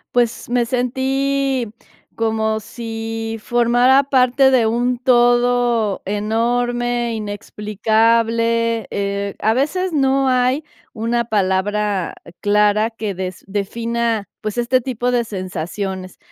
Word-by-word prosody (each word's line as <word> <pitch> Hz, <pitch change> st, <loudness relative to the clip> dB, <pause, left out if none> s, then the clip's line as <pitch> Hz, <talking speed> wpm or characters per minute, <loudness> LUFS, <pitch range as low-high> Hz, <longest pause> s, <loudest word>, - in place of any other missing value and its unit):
Pues, 240 Hz, -1 st, 0 dB
me 245 Hz, -1 st, +2 dB
sentí 265 Hz, +1 st, 0 dB, 0.5 s
como 220 Hz, -1 st, 0 dB
sí 225 Hz, 0 st, -5 dB
formara 245 Hz, +4 st, +3 dB
parte 265 Hz, 0 st, +3 dB
de 250 Hz, -3 st, +4 dB
un 245 Hz, +2 st, 0 dB
todo 240 Hz, -3 st, +2 dB
enorme, 240 Hz, +3 st, 0 dB
inexplicable, 225 Hz, +2 st, 0 dB
eh, 200 Hz, 0 st, -2 dB
a 220 Hz, -, +2 dB
veces 335 Hz, +8 st, -1 dB
no 270 Hz, -2 st, +2 dB
hay 255 Hz, +4 st, +1 dB, 0.3 s
una 235 Hz, +1 st, -1 dB
palabra 205 Hz, -2 st, 0 dB, 0.3 s
clara 210 Hz, +1 st, +3 dB
que 220 Hz, -3 st, -4 dB
des 185 Hz, 0 st, -6 dB
defina, 225 Hz, +1 st, -2 dB
pues, 215 Hz, +1 st, -4 dB
este 240 Hz, +2 st, +2 dB
tipo 245 Hz, 0 st, -2 dB
de 245 Hz, -1 st, +2 dB
sensaciones. 185 Hz, -1 st, -5 dB
230 Hz, 105 wpm, -19 LUFS, 210-245 Hz, 0.5 s, de